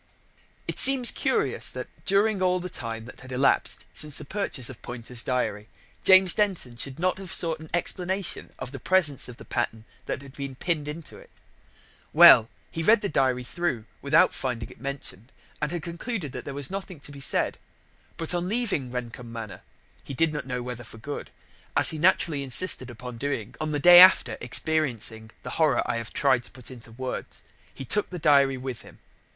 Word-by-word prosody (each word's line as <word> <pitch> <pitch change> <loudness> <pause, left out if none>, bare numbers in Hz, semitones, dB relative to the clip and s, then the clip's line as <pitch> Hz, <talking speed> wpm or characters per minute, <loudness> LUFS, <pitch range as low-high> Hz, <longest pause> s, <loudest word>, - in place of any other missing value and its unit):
It - - -3
seems 260 -2 +7
curious - - +1
that, - - -6 0.2
during 200 0 +2
all 185 0 +2
the 180 0 -7
time 115 -1 -6
that 120 - -12
had 130 0 -12
elapsed 135 +2 +1
since 150 -2 -1
the - - -5
purchase 150 - -2
of 130 -4 -9
Poynter's 120 0 -3
diary, 110 -4 -2 0.3
James 190 -2 +7
Denton 190 - -1
should 130 +3 -3
not 185 +2 -1
have 190 -3 -8
sought 165 -2 0
an 160 0 -12
explanation 180 +2 -2
of 125 - -7
the 135 - -8
presence 155 -6 +2
of 120 - -11
the - - -12
pattern 115 -2 -3 0.2
that 135 - -4
had 135 -1 -13
been 140 -2 -7
pinned 155 +1 -2
into 155 +2 -8
it. - - -17 0.8
Well, 110 0 +8 0.2
he 165 - -4
had 165 - -4
read 220 0 +5
the 200 - -2
diary 130 -3 +1
through 130 -5 -3 0.2
without 145 +4 +3
finding 120 -4 -4
it - - -17
mentioned, 135 -5 -7 0.3
and 150 0 -1
had 175 -2 -4
concluded 170 - -5
that - - -8
there 140 - -6
was 140 +3 +2
nothing 190 -4 -6
to 145 - -6
be 140 - -11
said. 135 - 0 0.6
But, 165 +1 +1
on 175 +1 -2
leaving 205 - -1
Rendcomb 120 -1 -7
Manor 110 -6 -8 0.4
(he 135 - -8
did 165 +2 +1
not 150 - -5
know 125 -1 -4
whether 120 -1 -6
for 110 - -13
good), 145 +6 -7 0.5
as - - +8
he 160 - -6
naturally 165 -3 +2
insisted 135 0 0
upon 120 0 -9
doing 130 -5 -4
on 155 0 -2
the 150 - -1
day 175 +3 +9
after 180 -11 +7
experiencing 120 -5 0
the - - -6
horror - - +3
I - - -2
have 115 -1 -6
tried 130 -4 +2
to - - -10
put 125 0 -12
into 120 -3 -11
words, 130 +2 -6 0.3
he 135 - -9
took 210 - -1
the 180 - -6
diary 140 -4 +3
with 130 -2 -6
him. - - -16
140 Hz, 195 wpm, -25 LUFS, 125-175 Hz, 0.8 s, day